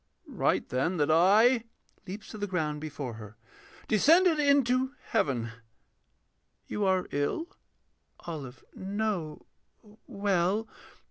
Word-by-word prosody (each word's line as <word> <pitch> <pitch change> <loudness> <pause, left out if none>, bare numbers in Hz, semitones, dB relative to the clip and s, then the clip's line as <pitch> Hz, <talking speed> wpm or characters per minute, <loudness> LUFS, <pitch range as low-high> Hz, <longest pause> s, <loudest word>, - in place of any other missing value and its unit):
Write, - - 0
then, 150 +9 0
that 150 0 +2
I 215 +9 +5 0.4
[Leaps 205 +4 -8
to 215 - -8
the 205 - -2
ground 155 -5 -2
before 145 -5 -5
her.] 105 0 -11 0.5
Descended 320 - +4
into 270 -2 +2
heaven.... 120 -5 0 1.1
You 210 - -2
are 185 -1 +1
ill? 325 - -2 0.7
OLIVE. 140 -7 -7
No, 195 -5 -3 0.6
well.... 200 +2 0
190 Hz, 105 wpm, -29 LUFS, 150-225 Hz, 1.1 s, I